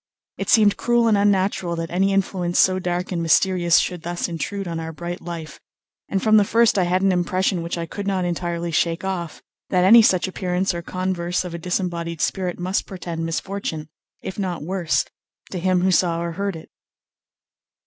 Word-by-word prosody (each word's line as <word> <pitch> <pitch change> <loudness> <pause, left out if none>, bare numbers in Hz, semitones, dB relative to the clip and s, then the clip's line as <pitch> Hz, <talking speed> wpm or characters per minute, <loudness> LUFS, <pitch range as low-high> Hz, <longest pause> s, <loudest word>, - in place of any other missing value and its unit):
It - - -3
seemed 210 -3 +5
cruel 240 -1 +2
and 220 - +4
unnatural 195 -3 +1
that 165 0 -4
any 190 +3 +2
influence 185 -2 0
so 185 0 +4
dark 180 0 -2
and 175 -2 -1
mysterious 175 +2 +3
should 180 -2 0
thus 175 +1 -3
intrude 185 +3 -4
on 165 -1 -3
our 160 0 -5
bright 175 +2 -6
life, 165 -4 -7 0.5
and 195 - -1
from 215 -1 +5
the 210 - +6
first 230 0 +3
I 180 - +2
had 185 +2 +1
an 195 - +4
impression 185 +1 0
which 170 +1 -4
I 170 - -3
could 200 +4 -6
not 190 -2 0
entirely 170 -1 -2
shake 165 +2 0
off, 180 -4 -4 0.3
that 180 -1 +2
any 230 +4 +9
such 185 -4 +3
appearance 185 0 -1
or 170 - -4
converse 180 0 -2
of 175 - -6
a 170 - -5
disembodied 170 -2 -3
spirit 180 +1 -1
must 185 +2 -2
portend 170 -3 -5
misfortune, 165 -3 -4 0.3
if 190 - -6
not 180 -5 -3
worse, 175 -1 0 0.5
to 185 - -3
him 185 0 +2
who 190 +1 +2
saw 170 -2 +2
or 170 0 -3
heard 200 +2 -3
it. 160 - -11
180 Hz, 190 wpm, -22 LUFS, 170-190 Hz, 0.5 s, any